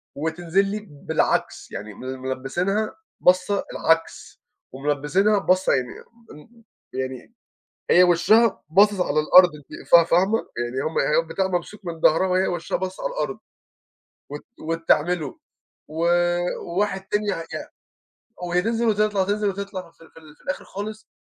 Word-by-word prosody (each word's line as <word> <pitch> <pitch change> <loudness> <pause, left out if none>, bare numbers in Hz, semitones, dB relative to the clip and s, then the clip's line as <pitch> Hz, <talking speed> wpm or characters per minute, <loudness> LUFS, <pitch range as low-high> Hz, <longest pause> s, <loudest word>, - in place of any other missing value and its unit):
وتنزل 165 +5 0
لي 210 +1 -5
بالعكس، 145 -1 -1
يعني 105 +1 -7
مل 130 +5 -7
ملبسينها 155 +12 -2 0.2
باصة 185 +2 +2
العكس، 165 0 -1 0.3
وملبسينها 150 +10 +1
باصة 185 -1 +2
يعني 125 -2 0 0.4
ان 230 +10 -16 0.3
يعني 130 - -5 0.6
هي 180 - +7
وشها 210 +6 +3
باصص 200 +3 +4
على 155 -3 +1
الأرض 180 +3 +7
أنتِ 150 +1 -12
فا 170 -1 +8
فاهمة؟ 190 +7 +2 0.2
يعني 120 +2 -2
هُم 160 - -2 0.3
البتاع 190 +4 -2
ممسوك 185 +3 -4
من 165 -1 -5
ضهرها، 165 +4 +4
وهي 185 0 +1
وشها 175 -2 -2
باصص 185 0 -5
على - - -1
الأرض. - - -3 0.9
وت - - -8
وت 165 +1 -4
تعملُه، 160 -1 +1 0.5
و 160 +3 -2 0.5
وواحد 190 +1 -2
تاني 210 0 0
يع 165 -4 -2 1.0
وهي 180 +1 +1
تنزل 230 +2 0
وتطلع 210 -2 +1
وتنزل 205 +1 0
وتطلع، 190 -2 -5
في 165 0 -20
ال - - -19
في - - -16
ال 155 -1 -17
في - - -26
الآخر 185 - -4
خالص 215 +2 -7
180 Hz, 145 wpm, -23 LUFS, 155-200 Hz, 1.0 s, فا